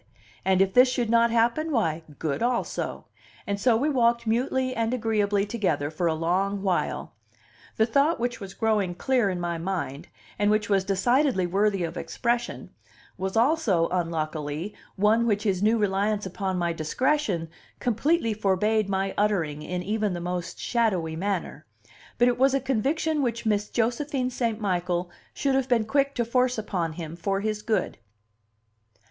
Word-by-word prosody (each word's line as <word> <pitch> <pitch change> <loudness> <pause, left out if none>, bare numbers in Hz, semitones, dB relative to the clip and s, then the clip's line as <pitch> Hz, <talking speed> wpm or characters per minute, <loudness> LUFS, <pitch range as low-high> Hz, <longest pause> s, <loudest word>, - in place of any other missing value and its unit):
and 190 0 +4
if 190 0 -3
this 250 +1 +6
should 240 -3 -1
not 235 0 +5
happen, 235 +8 +1
why, 165 - 0 0.2
good 155 +1 -2
also! 240 0 -2 0.4
And 200 0 -2
so 240 -3 +4
we 275 +6 0
walked 235 -5 +2
mutely 255 +3 0
and 230 +2 0
agreeably 210 -3 +1
together 185 -10 -1
for 170 +2 -1
a 160 - +1
long 190 +5 0
while. 185 -3 -1 0.6
The 220 - +4
thought 280 +8 +2
which 245 0 -2
was 195 -2 -8
growing 210 -5 +1
clear 250 0 +1
in 180 -2 -2
my 170 -1 -2
mind, 165 -4 -4 0.3
and 205 0 +3
which 210 0 +1
was 195 -2 +3
decidedly 235 +2 +2
worthy 195 +1 +1
of 170 +1 -4
expression, 240 0 -2 0.4
was 190 +3 -3
also 230 - +2
unluckily 160 0 -2 0.2
one 220 +4 +3
which 210 -2 +1
his 195 -4 0
new 220 +3 +3
reliance 205 0 0
upon 190 0 -3
my 170 -1 0
discretion 180 - 0 0.3
completely 245 +2 +1
forbade 210 +1 +1
my 195 0 -1
uttering 170 -8 0
in 180 +3 -4
even 210 0 -1
the - - -4
most 175 0 -4
shadowy 190 -10 0
manner; 180 -4 -3 0.5
but 245 - +4
it 245 0 +1
was 270 +1 +4
a - - +2
conviction 285 +5 0
which 235 -3 -2
Miss 210 -1 +1
Josephine 250 +3 -1
St. 230 -3 -1
Michael 180 -3 -1 0.2
should 275 -1 0
have 265 0 +1
been 230 -3 +3
quick 275 +3 +1
to 235 - 0
force 250 +1 +1
upon 180 -7 -2
him 160 -1 -7
for 195 +3 -1
his 215 0 -2
good. 215 0 -1
210 Hz, 165 wpm, -26 LUFS, 180-240 Hz, 0.6 s, this